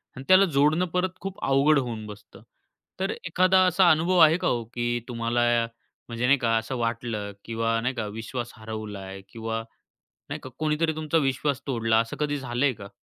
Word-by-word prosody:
आणि 130 - -8
त्याला 185 +1 +7
जोडणं 155 +2 +2
परत 180 +1 +1
खूप 195 0 -6
अवघड 140 +2 +4
होऊन 115 -4 -4
बसतं. 105 -1 -12 0.6
तर 190 +1 0 0.2
एखादा 185 +2 +4
असा 180 0 +4
अनुभव 170 +4 +2
आहे 160 +2 +3
का - - -1
हो, 120 -1 0
की 120 +1 -2
तुम्हाला 120 0 0
या 115 -1 +2 0.4
म्हणजे 115 +1 -2
नाही 140 +2 +5
का, 115 -3 +1
असं 115 +3 -3
वाटलं 115 -3 -3
किंवा 115 0 0
नाही 125 +3 -1
का, 115 - -2
विश्वास 115 +3 -5
हरवलाय 105 -3 -7
किंवा 115 0 -4 0.7
नाही - - -5
का, 130 - -9
कोणीतरी 155 +1 +1
तुमचा 155 +1 0
विश्वास 140 -1 0
तोडला 115 -4 +1
असं 115 0 -4
कधी 145 -1 0
झालंय 130 +1 0
का? 100 -4 -10
120 Hz, 180 wpm, -26 LUFS, 115-155 Hz, 0.7 s, त्याला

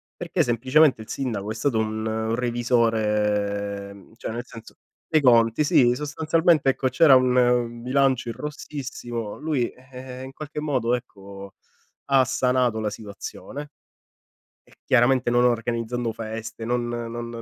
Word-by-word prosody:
perché - - -1
semplicemente 130 +3 +3
il 110 - -12
sindaco 110 -6 -3
è 110 - -3
stato 115 0 0
un 110 +1 -2
revisore, 105 -4 0
mhmm, 100 +2 -17
cioè - - -5
nel 120 +2 -5
senso, 115 -2 -13 0.3
dei 155 -2 +2
conti, 115 +1 +4
sì. 120 -3 +4
Sostanzialmente 155 +1 +2
ecco 130 0 0
c'era 155 -1 +6
un 130 -1 +3
un 120 -1 +2
bilancio 130 -1 +1
in 115 - -5
rossissimo, 125 -6 -6
lui, 145 -5 0
ehm, 130 0 -10
in 135 - -10
qualche 150 0 -7
modo 130 -6 0
ecco, 100 -5 -7 0.5
ha 135 -1 +5
sanato 125 -3 +1
la 110 -1 -1
situazione 115 +7 -8 0.9
e - - -23
chiaramente 125 0 +3
non 120 0 +3
organizzando 115 0 -1
feste, 115 0 -6
non 120 0 -1
non 120 0 -5
120 Hz, 140 wpm, -24 LUFS, 110-130 Hz, 0.9 s, c'era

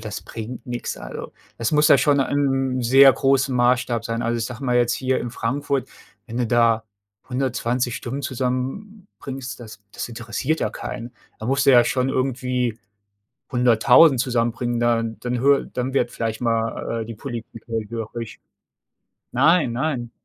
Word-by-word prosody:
das 110 -1 -6
bringt 115 +2 -8
nix. 120 -1 -4
Also, - - -8 0.3
das 115 +4 -1
muss 150 0 +4
ja - - +8
schon 145 -2 +3
in 140 +1 +1
'nem 130 -1 0
sehr 135 +3 +7
großem 135 -1 +1
Maßstab 120 -1 +2
sein. 115 0 -2
Also, 115 +1 0
ich 115 - -2
sage 130 +2 -8
mal 125 -1 +1
jetzt 120 -1 +3
hier 130 0 0
in 120 - -4
Frankfurt, 135 +2 -2 0.4
wenn 115 - -7
du 120 - +1
da 115 -1 +3 0.5
120 125 -1 -1
Stimmen 130 +4 -5
zusammenbringst, 135 - -4
das 110 -3 -11
das - - -4
interessiert 120 +6 -3
ja - - +1
keinen. 120 -1 -7 0.3
Da 110 - -6
musst 135 +2 +1
du - - +8
ja 120 - +8
schon 130 0 0
irgendwie 125 -3 -1 0.7
100.000 125 +4 +5
zusammenbringen, 120 -1 -1
dann 115 -1 0
dann 125 0 -2
höre 140 +1 +4
dann 130 +2 -4
wird 120 -3 +1
vielleicht 115 0 -3
mal, 115 0 -1
äh, 110 - -7
die 115 - -7
Politik 115 -2 -8
hellhörig. 115 0 -5 0.9
Nein, 150 +2 +3
nein. 125 -2 -2
125 Hz, 160 wpm, -22 LUFS, 115-135 Hz, 0.9 s, ja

